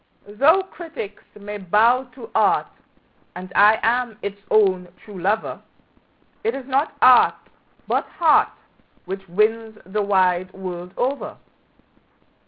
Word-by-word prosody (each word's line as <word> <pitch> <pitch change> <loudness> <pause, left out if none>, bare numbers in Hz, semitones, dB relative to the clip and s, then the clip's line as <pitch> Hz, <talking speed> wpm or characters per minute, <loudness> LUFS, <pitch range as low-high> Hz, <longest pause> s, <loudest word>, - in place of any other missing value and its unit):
Though 320 +7 +5
critics 325 - -9 0.2
may 205 0 -7
bow 225 +7 +3
to 445 - -11
art, - - +3 0.7
and 180 0 -9
I 210 +2 +6
am 240 -1 0
its 200 0 -5
own 190 -4 +2 0.2
true 200 -4 -10
lover, 210 +5 -1 0.8
It 455 - -1
is 270 - -7
not 275 +3 -1
art, 255 -1 +7 0.5
but - - 0
heart, 320 -3 +3 0.6
which 190 +2 -5
wins 220 +3 0
the 200 +3 -2
wide 185 -2 +1
world 180 -1 -8
over. 270 +3 -2
210 Hz, 120 wpm, -21 LUFS, 190-255 Hz, 0.8 s, art